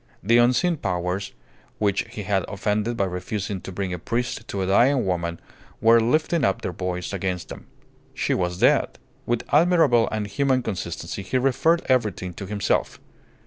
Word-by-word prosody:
The 115 +4 +4
unseen 130 +8 +3
powers 90 -1 -2 0.5
which 100 -2 +1
he 105 - -6
had 100 -2 0
offended 105 +3 -1
by 100 - +2
refusing 95 +1 -4
to - - -8
bring 95 0 -3
a 90 - -4
priest 120 +3 -3
to 100 -1 -2
a - - -1
dying 120 +7 +3
woman 85 -2 -2 0.4
were 115 +1 +6
lifting 155 +7 +1
up 100 -5 +1
their - - -2
voice 90 +1 -4
against 90 -2 -3
him. - - -10 0.5
She - - 0
was 90 -1 -1
dead. - - +3 0.3
With 120 -1 0
admirable 150 -7 +4
and 110 -1 -2
human 130 +5 +1
consistency 85 -3 -4
he 100 +7 -1
referred 135 +6 +2
everything 105 -8 0
to 95 +3 -7
himself. 100 -1 -1
105 Hz, 165 wpm, -24 LUFS, 95-120 Hz, 0.5 s, were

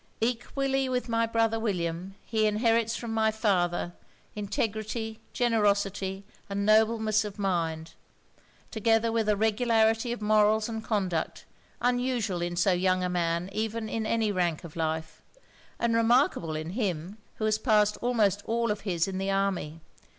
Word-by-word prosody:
Equally 265 +3 -1
with 250 -1 -1
my 230 -1 +1
brother 225 0 +1
William, 185 -3 -2
he 220 -2 +1
inherits 225 +1 +2
from 230 -2 -5
my 220 0 +3
father, 180 -5 0 0.4
integrity, 215 +2 -3
generosity 200 -4 0 0.2
and 200 0 -2
nobleness 220 0 +3
of 210 -1 -7
mind, 165 -5 -2 0.8
together 225 +1 +2
with 225 -2 0
a 210 - +4
regularity 225 +1 +2
of 240 - -3
morals 215 0 +3
and 225 -1 -5
conduct, 190 -8 -2 0.4
unusual 245 -6 0
in 175 0 -2
so 180 +3 +3
young 185 0 +1
a 180 - 0
man 170 0 0
even 220 +1 -2
in 220 0 -2
any 225 -2 +1
rank 175 -5 -1
of 165 -3 -10
life, 160 -1 -3 0.6
and 235 -1 0
remarkable 230 - +2
in 155 +2 -4
him, 190 -2 -3 0.2
who 215 - -2
has 215 0 +1
passed 210 -3 +3
almost 215 -5 +1
all 230 -1 +1
his 185 -5 -1
in 190 -1 -3
the 195 0 -2
army. 195 -5 -1
215 Hz, 145 wpm, -28 LUFS, 185-225 Hz, 0.8 s, a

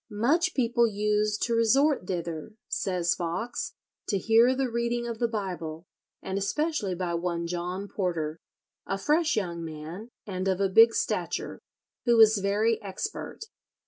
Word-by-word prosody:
"Much 295 - +1
people 235 -2 +3
used 210 0 0
to 235 - 0
resort 230 0 +3
thither," 170 0 -4
says 180 -3 0
Foxe, 180 +8 -3 0.3
to 200 - +1
hear 225 +6 +4
the 265 0 0
reading 235 0 -1
of 230 -2 -5
the 235 - +2
Bible, 180 -7 -4 0.4
and 190 +1 -2
especially 210 - -1
by 175 -1 -2
one 170 0 -2
John 180 +3 -3
Porter, 165 -6 -2 0.5
"a 195 - -1
fresh 305 - +2
young 170 -5 -2
man, 160 +7 -7 0.2
and 185 -2 -3
of 190 -1 +1
a 195 -1 +2
big 225 +4 +7
stature," - - -2 0.5
who 235 -2 +4
was 220 -1 +7
very 210 +3 +1
expert. 205 - -5
205 Hz, 145 wpm, -27 LUFS, 180-235 Hz, 0.5 s, big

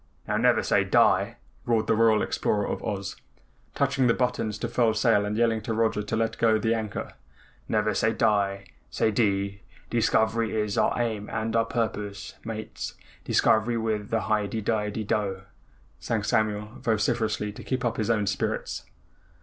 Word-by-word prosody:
"Now - - 0
never - - +3
say - - +3
die!" - - +3 0.3
roared 115 -2 +1
the - - +2
Royal 110 -1 +4
Explorer 105 -1 0
of - - -4
Oz, 100 -1 -4 0.6
touching 135 -2 +2
the 115 - +3
buttons 125 -4 -1
to 120 - -3
furl 115 -2 +2
sail 110 -2 +3
and 105 +1 -2
yelling 115 -1 +2
to 110 +1 -3
Roger 110 -2 +1
to 105 +1 -3
let 115 0 -1
go 110 -1 +4
the 110 +2 +1
anchor. 110 -3 -4 0.6
"Never 105 0 +1
say 110 +3 +2
die 100 -4 +1 0.2
say 110 - +1
dee 100 -2 0 0.3
dee 120 - +1
scovery 110 0 +2
is 105 -1 -1
our - - +2
aim 110 -3 -2
and 110 +1 -2 0.2
purpose, 105 -4 -3
Mates. 110 -1 -6 0.3
Dee - - -4
scovery 115 +2 +3
with 110 -2 -2
a 115 -1 +1
hi 105 -1 0
de 110 +3 -3
di - - -4
dide 105 -1 -1
di 110 - -3
dough!" 100 -3 -1 0.6
sang - - -1
Samuel 105 +1 -1
vociferously 110 -2 0
to 105 - -10
keep 130 -1 -2
up 115 -1 -1
his 110 0 -1
own 110 -3 +2
spirits. 100 -8 -2
110 Hz, 175 wpm, -26 LUFS, 105-115 Hz, 0.6 s, Royal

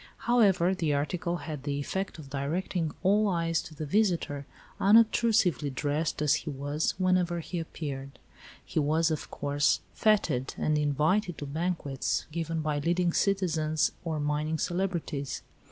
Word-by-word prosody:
However, 195 -7 +4
the 160 -6 0
article 170 +4 -1
had 150 -4 -5
the 140 0 -2
effect 190 +7 -3
of 140 -4 -11
directing 160 +4 -2
all 205 +3 +4
eyes 165 -3 +1
to 155 - -11
the 155 - -4
visitor, 165 -6 0 0.3
unobtrusively 215 - +4
dressed 145 +3 -1
as 150 - +4
he 160 - -6
was, 145 +2 -1
whenever 185 -2 +2
he 170 +2 -4
appeared. 140 -4 -6 0.5
He - - -1
was, 160 +2 +2
of 155 - -3
course, 145 +1 +1
fêted 200 - +1
and 155 - +1
invited 150 +6 +1
to 145 - -5
banquets 150 -2 -2
given 165 0 -2
by 150 -1 -1
leading 170 +3 +1
citizens 160 -6 +1
or 160 -3 -2
mining 150 +2 -1
celebrities. 175 -6 -2
160 Hz, 140 wpm, -29 LUFS, 145-180 Hz, 0.5 s, However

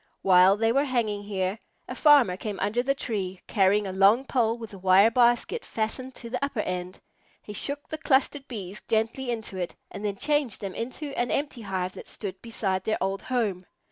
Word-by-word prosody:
While 190 +1 +6
they 225 +1 +2
were 275 +4 +2
hanging 230 -6 -1
here, 195 0 -2 0.3
the - - -5
farmer 285 -11 +5
came 205 +1 -5
under 205 +5 0
the 275 +2 0
tree, 190 -8 -3
carrying 200 0 +2
a 190 - -4
long 200 +7 +4
pole 235 -3 +1
with 225 -3 -9
a 195 - -9
wire 190 +4 +5
basket 240 - +2
fastened 255 +4 -3
to 235 - -8
the 250 +2 -2
upper 280 -6 -1
end. 180 -1 -4 0.4
He 210 - -8
shook 285 +7 0
the 315 - -6
clustered 275 +1 +1
Bees 205 -4 -6
gently 225 +4 0
into 220 -5 -4
it, 180 -2 -4 0.2
and 200 - -7
then 205 -2 -1
changed 290 0 0
them 195 -3 -5
into 260 +8 -5
an 240 0 0
empty 280 -4 -2
hive 190 -3 -3
that - - -10
stood 190 -3 -6
beside 195 -5 -2
their 215 +2 0
old 195 +1 -1
home. 215 -8 -1
220 Hz, 200 wpm, -26 LUFS, 195-250 Hz, 0.4 s, While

